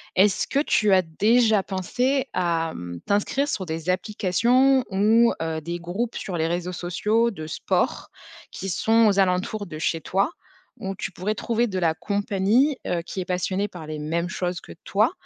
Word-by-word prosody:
Est-ce 195 +1 +3
que - - -2
tu 215 -8 +2
as 185 - +6
déjà 215 +6 +3
pensé 250 +9 0
à 165 -3 0
mmh, 85 -1 -7
t'inscrire 210 +8 +1
sur 190 - -2
des 160 +1 -4
applications 235 +8 +2
ou 220 +4 +4
heu, 160 -1 -3
des 170 +3 -4
groupes 195 +8 -3
sur 180 -3 -4
les 160 0 +1
réseaux 175 +2 -2
sociaux 210 +7 +1
de 155 -6 -7
sport 155 - -1 0.4
qui 195 - -5
sont 225 +6 +3
aux 200 -1 +3
alentours 190 +3 0
de 155 -2 -7
chez 165 0 -1
toi? 195 - 0 0.5
Où 195 0 -4
tu 195 - -5
pourrais 195 +4 -2
trouver 235 +2 0
de 190 -4 -4
la 165 -3 +2
compagnie, 205 - +1
heu, 175 -1 0
qui 190 - -6
est - - -5
passionnée 185 +2 -1
par 175 -5 -10
les 155 -1 -5
mêmes 170 +4 -2
choses 180 -2 -3
que - - -13
toi? - - +2
190 Hz, 180 wpm, -24 LUFS, 175-220 Hz, 0.5 s, as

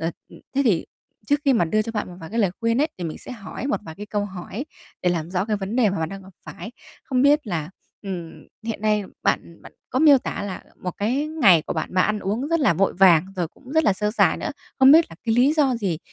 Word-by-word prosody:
Ờ, 165 - -1 0.2
ừ, - - -14 0.2
thế 275 - +3
thì 195 -9 +2 0.4
trước 290 +3 +2
khi 275 - +4
mà 220 -9 +3
đưa 215 +6 +1
cho 230 - -6
bạn 210 -3 -3
một 180 - -10
vài 160 - -9
cái 230 - -3
lời 200 -5 +3
khuyên 230 +2 +1
ấy 305 - +2
thì 175 - -4
mình 160 - -5
sẽ - - -9
hỏi 225 +3 -7
một 285 - -1
vài 160 -6 -9
cái 210 +5 -8
câu 205 -1 -1
hỏi 195 +6 -6 0.4
để 180 - +2
làm 170 -1 -2
rõ 185 0 0
cái 215 -1 -1
vấn 200 +3 -4
đề 230 -5 +4
mà 200 - -3
bạn 160 -1 -1
đang 195 +2 -8
gặp 190 +1 -15
phải. 225 - -9 0.3
Không 255 -2 +1
biết 290 0 +4
là, 165 -5 -3 0.3
ừm, 180 -5 -5 0.3
hiện 225 -3 -4
nay 210 -1 +1 0.2
bạn, - - +2
ừm, 170 - -17
bạn - - -13 0.2
có 255 - 0
miêu 290 -2 +7
tả 245 - -5
là, 200 -2 -4
ờ, - - -17
một 180 - -2
cái, 250 +9 0
ngày 240 - +4
của - - -4
bạn, - - -4
bạn 185 - +4
ăn 215 0 0
uống 215 +8 -2
rất 335 0 +1
là 270 - +4
vội 195 +4 +2
vàng, 180 -2 +6
rồi 175 -3 -1
cũng 260 - -14
rất 320 0 +3
là 205 - +4
sơ 210 +2 -1
sài 220 - +3
nữa, - - -4 0.3
không 265 0 +8
biết 325 +2 +7
là - - -11
cái 225 -2 +1
lý 255 +5 +4
do 290 -5 +2
gì 190 -8 -2
210 Hz, 285 wpm, -23 LUFS, 185-255 Hz, 0.4 s, không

